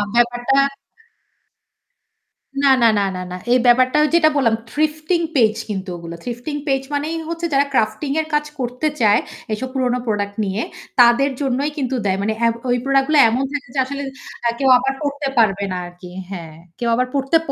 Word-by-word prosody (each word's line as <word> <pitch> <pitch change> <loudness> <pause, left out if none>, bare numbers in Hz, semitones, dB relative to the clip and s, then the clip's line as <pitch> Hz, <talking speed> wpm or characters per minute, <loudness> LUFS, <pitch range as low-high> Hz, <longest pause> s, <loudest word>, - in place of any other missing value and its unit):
ব্যাপারটা 245 +3 +2 2.0
না, 275 - +6
না, 235 - +6
না, 200 - +1
না, 185 - -4
না। 180 - -4
এই 250 - +5
ব্যাপারটা 255 +3 +4 0.2
যেটা 330 -2 +5
বললাম, 230 -5 +3 0.2
থ্রিফটিং 310 +3 0
পেজ 220 -5 +4
কিন্তু 195 -2 -4
ওগুলো। 170 0 -8
থ্রিফটিং 245 +5 -5
পেজ 270 -1 +1
মানেই 305 +3 -1
হচ্ছে 335 0 -3
যারা 280 +1 +4
ক্রাফটিং 255 +5 0
এর 310 - -8
কাজ 295 0 +2
করতে 250 +5 -2
চায়, 210 -1 +5 0.3
এইসব 255 +5 -2
পুরোনো 250 -2 0
প্রোডাক্ট 205 -2 -1
নিয়ে 195 +3 -2 0.4
তাদের 245 +4 +5
জন্যই 275 +2 0
কিন্তু 265 -2 -1
দেয়। 190 -1 +1
মানে 215 +2 0
এ - - +5 0.2
ওই 245 - +3
প্রোডাক্ট 275 0 +2
গুলো 305 - +5
এমন 250 +4 0
থাকে 285 -3 -4
যে 270 - +1
আসলে 280 +2 -5 0.5
আ - - +3
কেউ 270 - +3
আবার 270 +1 -1
পড়তে 285 0 -2
পারবে 200 -3 +3
না 185 - -2
আরকি। 175 0 -12 0.2
হ্যাঁ, 165 -4 -7 0.2
কেউ 235 - 0
আবার 250 +1 +1
পড়তে 275 +3 +2
255 Hz, 180 wpm, -20 LUFS, 220-280 Hz, 2.0 s, না